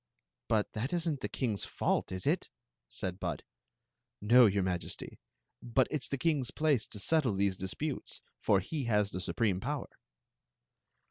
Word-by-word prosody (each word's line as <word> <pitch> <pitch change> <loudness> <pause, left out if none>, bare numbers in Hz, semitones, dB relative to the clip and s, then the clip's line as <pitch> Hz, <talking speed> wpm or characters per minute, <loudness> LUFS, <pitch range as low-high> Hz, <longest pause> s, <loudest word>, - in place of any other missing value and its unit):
" - - -59
But 110 -2 +1
that 125 +9 -2
is 175 -1 +1
n't 150 -4 0
the - - -2
king's 110 -7 -1
fault, - - 0
is 95 -1 -2
it? - - +1 0.2
" - - -58
said 95 0 -3
Bud. - - -3 0.8
"No, 120 +3 +7
your 100 -1 +1
Majesty; 90 -2 -3 0.4
but 125 +2 +2
it's 140 -4 +1
the 140 - -1
king's 145 -4 +1
place 150 -7 +1
to 105 - -5
settle 135 -3 +2
these 100 -1 +1
disputes, 130 +11 -4 0.2
for 100 -1 +3
he 140 - -3
has 105 -3 +2
the 90 - -4
supreme 100 -1 0
power." 140 +6 -3
115 Hz, 165 wpm, -32 LUFS, 95-140 Hz, 0.8 s, No